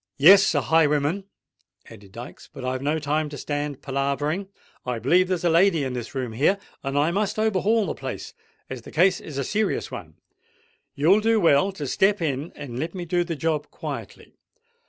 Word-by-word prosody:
"Yes—a 170 0 +6
highwayman," 150 - +2 0.6
added 100 -4 -14
Dykes. 120 +1 -10
"But 130 - -8
I've 130 0 -2
no 150 +3 0
time 155 0 -1
to 145 - -8
stand 145 0 -4
palavering. 140 +6 -1 0.4
I 125 -2 -2
b'lieve 175 +11 +3
there's 180 -2 -1
a 175 - +3
lady 170 -2 +4
in 130 -2 -3
this 120 +1 -6
room 130 -3 -2
here; 150 - +2 0.2
and 135 0 -3
as - - +4
I 155 +3 +2
must 205 +3 -1
overhaul 215 0 +2
the - - -2
place—as 130 -2 -9
the - - -12
case 180 +3 +3
is 150 -4 -8
a 140 - 0
serious 215 +9 -1
one—you'll 455 - -3
do 225 0 +3
well 170 +1 +4
to 150 -6 -5
step 195 +9 +2
in 150 -1 -2
and 130 -5 -7
let 165 +5 -4
me 180 -2 -5
do 175 +1 +1
the 170 -1 -4
job 155 0 -1
quietly. - - -8
155 Hz, 180 wpm, -24 LUFS, 140-190 Hz, 0.6 s, Yes—a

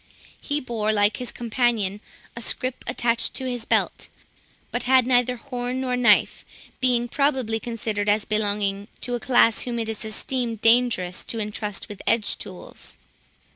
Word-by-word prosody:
He 290 0 -1
bore, 225 -5 -1
like 205 0 +3
his 250 - -4
companion, 230 -4 0 0.3
a 235 - -6
scrip, 255 +2 -1
attached 235 -1 0
to 265 - -3
his 245 -3 -3
belt, - - 0 0.6
but - - -1
had 260 -2 +6
neither 250 0 +3
horn 250 0 -4
nor 255 -1 0
knife, 250 -1 +4 0.4
being 245 -2 +2
probably 260 -4 +1
considered 220 -3 -2
as 205 0 +2
belonging 205 -2 0
to 245 - -3
a 240 - 0
class 235 -2 +4
whom 240 -1 -2
it 225 -1 -2
is 220 0 -4
esteemed 230 +1 -2
dangerous 225 -6 +3
to 230 - -5
intrust 210 -1 -3
with 205 -2 -9
edge 225 -2 +1
tools. - - -8
235 Hz, 155 wpm, -24 LUFS, 215-250 Hz, 0.6 s, had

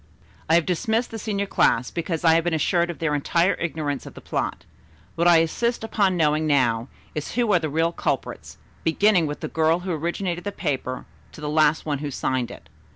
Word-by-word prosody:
"I 165 - +5
have 170 -2 +3
dismissed 220 +7 0
the 225 - -5
senior 200 -2 -2
class, 125 -10 +2
because 170 -1 -3
I 165 -1 +6
have 165 0 +3
been 175 -1 0
assured 170 +2 +1
of 175 - -5
their 160 -2 -1
entire 170 +5 +2
ignorance 155 -4 -3
of - - -11
the - - -9
plot. - - -3 0.5
What 170 +1 +1
I 170 -2 +7
insist 235 +9 -1
upon 200 -4 +1
knowing 155 -1 +2
now, 120 -5 +2 0.3
is 150 - -5
who 235 -4 +2
are 180 - +5
the 160 -2 -3
real 165 +3 +1
culprits, - - -3 0.3
beginning 180 0 +3
with 145 - -5
the - - -3
girl 160 +2 +1
who 185 0 -4
originated 175 +2 -2
the 205 - -3
paper 130 -2 -3 0.3
to - - -11
the 150 - -5
last 155 0 +3
one 145 -3 -1
who 145 0 -4
signed 130 -2 -1
it. - - -12
165 Hz, 210 wpm, -24 LUFS, 150-180 Hz, 0.5 s, I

